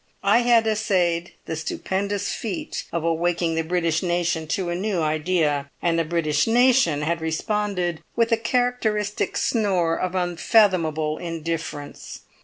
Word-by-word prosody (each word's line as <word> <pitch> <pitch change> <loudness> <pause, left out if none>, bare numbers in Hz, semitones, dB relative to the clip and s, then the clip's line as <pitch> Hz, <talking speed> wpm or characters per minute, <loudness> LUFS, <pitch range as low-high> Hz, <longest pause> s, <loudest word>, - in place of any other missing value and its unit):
I - - +5
had 240 -2 +4
essayed 185 -6 0
the 160 - -4
stupendous 200 +5 -2
feat 205 -6 -4
of 170 -1 -2
awaking 170 0 0
the 165 - 0
British 165 -1 0
nation 175 -2 -1
to 175 +2 -1
a - - -1
new 190 0 -1
idea, 155 -2 0
and 165 -1 +1
the - - +2
British 155 -1 0
nation 240 - +4
had 165 +1 -1
responded 180 +1 -1
with 230 0 +2
a 230 - +4
characteristic 225 -3 0
snore 185 -7 +1
of 185 +1 -3
unfathomable 175 -4 +2
indifference. 165 -3 -5
175 Hz, 135 wpm, -23 LUFS, 165-210 Hz, -, I